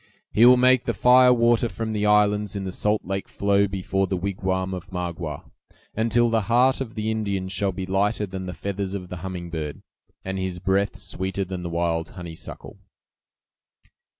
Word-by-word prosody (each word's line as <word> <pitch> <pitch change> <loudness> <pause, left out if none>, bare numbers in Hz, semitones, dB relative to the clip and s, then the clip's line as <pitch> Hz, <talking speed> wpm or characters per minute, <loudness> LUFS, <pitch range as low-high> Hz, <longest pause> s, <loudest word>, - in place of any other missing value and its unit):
"He 115 +4 +6
will 125 0 +8
make 125 0 +4
the - - -1
fire 125 0 +6
water 120 -1 +3
from 110 -1 -4
the 105 0 0
islands 105 -1 +3
in 100 - -3
the 95 - -4
salt 105 +3 0
lake 95 +1 -3
flow 100 0 +2
before 95 0 -1
the 95 - -1
wigwam 95 0 -2
of 90 0 -7
Magua, 85 -4 -4 0.5
until 115 +1 +2
the 115 -1 +2
heart 130 +3 +4
of 115 -4 -5
the 110 0 -1
Indian 100 -4 -2
shall 95 +1 0
be 95 +1 -5
lighter 100 +3 0
than 95 -1 -6
the 90 - -5
feathers 100 0 -4
of 90 -2 -6
the 90 - -6
humming 90 -1 -6
bird, 75 -3 -5 0.4
and 95 0 -3
his 95 -1 -3
breath 95 +2 0
sweeter 95 +1 -3
than 95 -1 -5
the 85 - -4
wild 85 -1 -1
honeysuckle." 85 -2 -9
95 Hz, 180 wpm, -24 LUFS, 95-110 Hz, 0.5 s, will